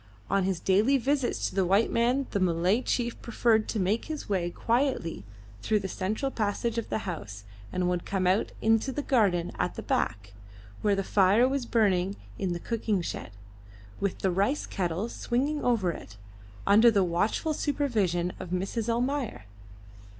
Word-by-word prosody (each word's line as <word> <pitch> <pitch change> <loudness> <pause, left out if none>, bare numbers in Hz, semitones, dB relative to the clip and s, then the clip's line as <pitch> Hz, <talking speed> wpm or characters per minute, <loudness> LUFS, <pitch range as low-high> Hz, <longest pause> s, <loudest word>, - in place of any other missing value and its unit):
On 195 -1 +2
his 190 -3 -1
daily 210 +11 +3
visits 270 0 0
to - - -7
the 195 - +2
white 195 +5 +3
man 245 +4 +2
the 200 - 0
Malay 180 +5 +2
chief 240 -2 -2
preferred 225 -2 +2
to 220 - -1
make 200 +5 0
his 310 -2 -5
way 185 -4 0
quietly 235 - -1 0.4
through 215 - +2
the 195 - -4
central 215 +9 -2
passage 225 +1 -1
of 230 - -6
the 220 - -2
house, 110 - -6 0.3
and 180 -1 0
would 180 -1 0
come 190 -2 -1
out 185 +4 +2
into 225 +4 +3
the 290 +2 -3
garden 195 -11 +2
at - - -1
the - - -6
back, 100 -1 -1 0.5
where 205 -2 +2
the 195 - -1
fire 200 +5 +4
was 265 -2 -2
burning 195 -4 +2 0.2
in 190 -2 -1
the 175 - -2
cooking 215 -3 -1
shed, - - -5 0.7
with 200 -2 -1
the 190 - +3
rice 200 +11 +1
kettle 180 +3 -2
swinging 275 +6 -1
over 220 -8 +2
it, 105 -9 -10 0.5
under 220 +4 +7
the 205 -4 +3
watchful 195 - 0
supervision 210 - 0
of 185 - -7
Mrs. 195 +6 -2
Almayer. 245 - -1
205 Hz, 170 wpm, -28 LUFS, 185-240 Hz, 0.7 s, under